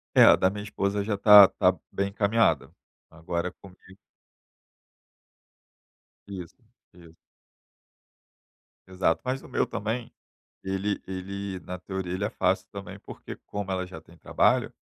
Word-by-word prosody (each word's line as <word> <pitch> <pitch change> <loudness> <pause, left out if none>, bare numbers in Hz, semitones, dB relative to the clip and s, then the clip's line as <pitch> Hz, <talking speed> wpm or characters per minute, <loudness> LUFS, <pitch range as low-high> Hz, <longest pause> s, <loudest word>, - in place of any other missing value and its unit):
É, - - +8
a - - +8
da 95 - +3
minha 105 +1 -6
esposa 100 -1 -2
já 105 -1 -1
tá 100 -1 +9
tá 90 -1 +2 0.2
bem 100 0 -1
encaminhada, 100 -5 +1 0.4
agora 85 +2 -4
comigo 95 -2 -16 2.5
Isso, 90 -4 -8 0.4
isso. 85 -2 -17 1.7
Exato. 90 -3 0
Mas 130 +1 -3
o - - -13
meu - - 0
também, 115 +3 -4 0.5
ele 95 +1 -2
ele 95 0 -6
na 90 +1 -7
teoria 95 -1 -5
ele 95 +2 -2
é - - -1
fácil 95 +1 0
também, 100 0 -8
porque - - -10
como 100 -1 -5
ela 95 -1 -2
já 90 -3 -10
tem 85 +2 -19
trabalho, - - +1
95 Hz, 135 wpm, -26 LUFS, 90-100 Hz, 2.5 s, tá